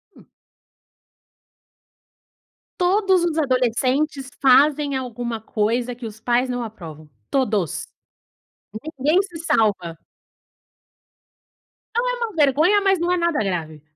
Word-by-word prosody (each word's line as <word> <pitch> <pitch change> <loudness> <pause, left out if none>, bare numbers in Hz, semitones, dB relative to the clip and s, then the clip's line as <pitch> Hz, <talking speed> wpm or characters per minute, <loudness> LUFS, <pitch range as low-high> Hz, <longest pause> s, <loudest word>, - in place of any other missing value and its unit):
Hum. - - -18 2.5
Todos 375 0 +3
os 330 -2 -1
adolescentes 265 +1 0
fazem 280 +2 +4
alguma 240 -2 -4
coisa 235 +3 -1
que 245 - -9
os 220 -1 -8
pais 245 +3 +1
não 245 -1 -2
aprovam. 160 -9 -10 0.2
Todos. 210 - -1 1.1
Ninguém 305 +8 +3
se 360 -4 -9
salva. 210 - 0 2.0
Não - - +1
é - - 0
uma 460 -6 -4
vergonha, 315 +8 +3
mas 390 -2 +2
não 345 +1 0
é 360 - +2
nada 340 -2 0
grave. 160 -4 -5
260 Hz, 105 wpm, -21 LUFS, 225-335 Hz, 2.5 s, fazem